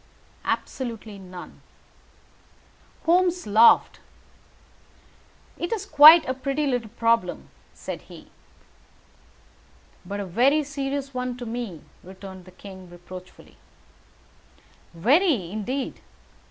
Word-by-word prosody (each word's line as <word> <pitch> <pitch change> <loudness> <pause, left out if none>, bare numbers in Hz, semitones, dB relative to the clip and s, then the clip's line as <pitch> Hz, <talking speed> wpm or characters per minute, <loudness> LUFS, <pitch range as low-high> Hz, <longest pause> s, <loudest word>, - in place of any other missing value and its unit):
"Absolutely 225 -5 -4
none." 180 -1 -11 1.4
Holmes 355 +1 +2
laughed. 215 +3 +5 1.6
"It 345 - -3
is 425 -4 -2
quite 315 -1 +9
a 260 - 0
pretty 275 +3 -2
little 245 -5 -2
problem," 230 -4 0 0.3
said - - -7
he. - - -14 1.7
"But 200 +1 -6
a 200 - -4
very 255 - +2
serious 275 -1 -4
one 250 -1 -4
to 245 - -7
me," 225 -8 -5 0.2
returned 190 0 -11
the 185 - -14
king, 185 -1 -12
reproachfully. 180 +1 -13 1.4
"Very, 245 - +2
indeed. 250 +6 -4
235 Hz, 95 wpm, -24 LUFS, 190-280 Hz, 1.7 s, quite